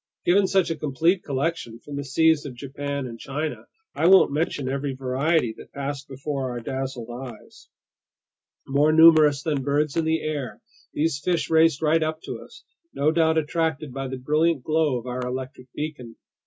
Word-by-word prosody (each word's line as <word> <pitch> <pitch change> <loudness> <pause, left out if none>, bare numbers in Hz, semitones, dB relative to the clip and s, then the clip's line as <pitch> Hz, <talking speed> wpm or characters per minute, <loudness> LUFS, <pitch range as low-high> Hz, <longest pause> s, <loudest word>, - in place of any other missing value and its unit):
Given 190 +2 +4
such 190 -3 +2
a - - -1
complete 160 +5 +1
collection 140 -4 -2
from 145 +4 -9
the 140 - -3
seas 160 +3 +3
of 130 - -9
Japan 140 +2 -5
and 115 -2 -8
China, 150 +3 -4 0.3
I 165 - +1
won't 190 -5 +7
mention 145 -2 -1
every 135 0 -2
variety 130 0 0
that - - -14
passed 140 0 -5
before 135 0 -4
our 120 -1 -4
dazzled 130 -1 -5
eyes. 125 0 -10 1.0
More 145 +3 +3
numerous 155 -3 +6
than 150 -4 -1
birds 145 +2 0
in 165 -1 +1
the 160 0 0
air, 150 -4 -4 0.3
these 150 -2 0
fish 175 -2 0
raced 160 -2 +4
right 160 +1 +3
up 155 0 -1
to - - -6
us, - - -15 0.3
no 145 +2 +2
doubt 160 0 +2
attracted 155 -3 -1
by 135 0 -4
the 130 0 -5
brilliant 150 +2 +1
glow 155 -3 +1
of 120 - -8
our 125 0 -4
electric 130 0 -6
beacon. 145 -7 -6
145 Hz, 175 wpm, -24 LUFS, 130-160 Hz, 1.0 s, won't